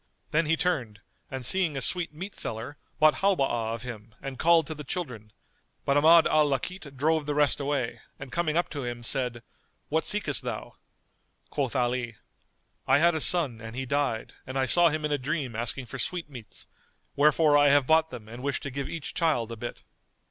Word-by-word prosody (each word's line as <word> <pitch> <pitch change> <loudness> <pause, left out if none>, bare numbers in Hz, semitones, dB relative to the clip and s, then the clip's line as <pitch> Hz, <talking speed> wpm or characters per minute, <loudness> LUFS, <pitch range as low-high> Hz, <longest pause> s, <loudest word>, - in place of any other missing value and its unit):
Then 160 +1 +2
he 165 +1 +2
turned 125 - -1 0.3
and 130 -2 -4
seeing 170 -2 +1
a - - 0
sweetmeat 180 +4 -3
seller 115 +6 -4 0.2
bought 155 0 +5
Halwá 135 - +1
of 115 - -9
him 110 -3 -9
and 135 -2 -7
called 165 -1 +5
to 155 - -4
the 150 -1 -8
children; 125 - -5 0.5
but 140 - +2
Ahmad 160 +3 +7
al 155 -1 +4
Lakit 140 +1 -4
drove 155 +2 +1
the 145 - -1
rest 145 -2 +4
away 140 -4 -2 0.2
and 135 -1 -9
coming 165 -2 0
up 175 - +2
to 145 -3 -4
him, 120 -1 -5
said, 120 -1 0 0.5
"What 160 +2 +1
seekest 205 -9 0
thou?" 120 -4 -5 0.8
Quoth 140 -3 -2
Ali, 120 -2 0 0.7
"I 135 - +5
had 170 +3 +4
a 160 - -1
son 140 -12 +1
and 115 +1 -8
he 130 +1 -3
died 140 -4 -1
and 130 +1 -4
I 135 - +2
saw 170 +6 +5
him 155 0 -2
in 150 - -2
a 145 - +1
dream 135 -3 -3
asking 120 +3 -2
for 130 +3 -8
sweetmeats: 140 - -6 0.5
wherefore 150 +1 +4
I 145 0 +6
have 140 -1 +5
bought 160 +2 +4
them 110 -8 -9
and 120 +3 -9
wish 140 0 -1
to 140 - -5
give 140 +1 -4
each 165 -4 -5
child 145 -9 0
a - - -4
bit." 120 +2 -7
140 Hz, 195 wpm, -27 LUFS, 125-160 Hz, 0.8 s, Ahmad